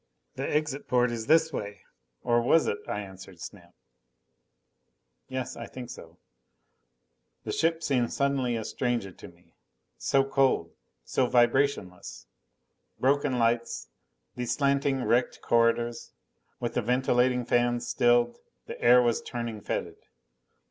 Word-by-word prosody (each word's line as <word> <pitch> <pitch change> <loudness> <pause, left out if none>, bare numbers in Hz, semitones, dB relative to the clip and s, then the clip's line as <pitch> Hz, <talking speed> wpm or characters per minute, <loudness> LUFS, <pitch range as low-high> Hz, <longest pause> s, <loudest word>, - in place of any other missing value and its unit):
"The 135 +1 -4
exit 150 -2 -1
port 125 -1 +2
is 115 -1 -5
this 160 -1 +4
way." 100 -4 -5 0.4
Or 120 -1 +2
was 155 +7 +4
it? 100 - -1
I 105 - -3
answered 95 -2 -11
Snap, 90 -1 -11 1.5
"Yes, 130 -2 -4
I 115 - -7
think 125 -1 -8
so." 85 -6 -12 1.3
The - - -4
ship 165 0 0
suddenly 135 -1 0
seemed 115 - -2
a - - -7
stranger 120 -6 -2
to - - -12
me. - - -21 0.5
So 135 -1 +2
cold. 135 -1 +1 0.3
So 125 - 0
vibrationless. 120 -6 0 0.7
Broken 140 0 +2
lights. 115 0 0 0.5
These 125 -1 -2
slanting 140 -2 +1
wrecked 125 +1 +1
corridors. 115 0 +1 0.5
With 120 - -3
the - - 0
ventilating 125 +1 +1
fans 120 0 +1
stilled, 120 0 +2 0.3
the - - -9
air 125 +1 +6
was 120 -1 +1
turning 115 -3 -5
fetid. - - -4
120 Hz, 130 wpm, -28 LUFS, 115-135 Hz, 1.5 s, air